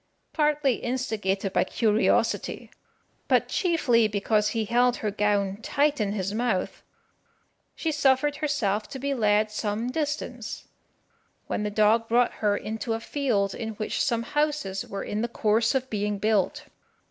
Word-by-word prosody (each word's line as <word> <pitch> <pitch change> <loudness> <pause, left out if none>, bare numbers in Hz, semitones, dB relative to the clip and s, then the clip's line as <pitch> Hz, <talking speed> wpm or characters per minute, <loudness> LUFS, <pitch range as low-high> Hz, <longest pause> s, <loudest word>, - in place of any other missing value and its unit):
Partly 295 -4 +2
instigated 210 -6 -2
by - - +3
curiosity, 215 +3 +1 0.6
but - - +3
chiefly 275 - +2
because 210 +1 +1
he 225 0 -1
held 245 +2 +3
her 210 - -2
gown 200 -1 0
tight 290 +1 +1
in 205 -1 0
his 195 -1 -2
mouth, 225 -4 -1 0.9
she 325 - -1
suffered 285 0 +2
herself 235 -9 -1
to - - -6
be 280 +2 -2
led 215 -3 +2
some 215 +3 -2
distance, 285 -6 -4 0.8
when - - -2
the 210 - -1
dog 215 +2 +3
brought 240 +1 +3
her 205 -1 +2
into 225 +1 -3
a 225 - -2
field 225 -7 0
in 225 -2 -5
which 215 - -2
some 235 -3 0
houses 295 -9 -1
were 195 0 -5
in 210 - -3
the 235 - 0
course 225 +1 +1
of 260 -1 0
being 210 -1 -1
built. 215 +8 +1
225 Hz, 145 wpm, -26 LUFS, 210-265 Hz, 0.9 s, by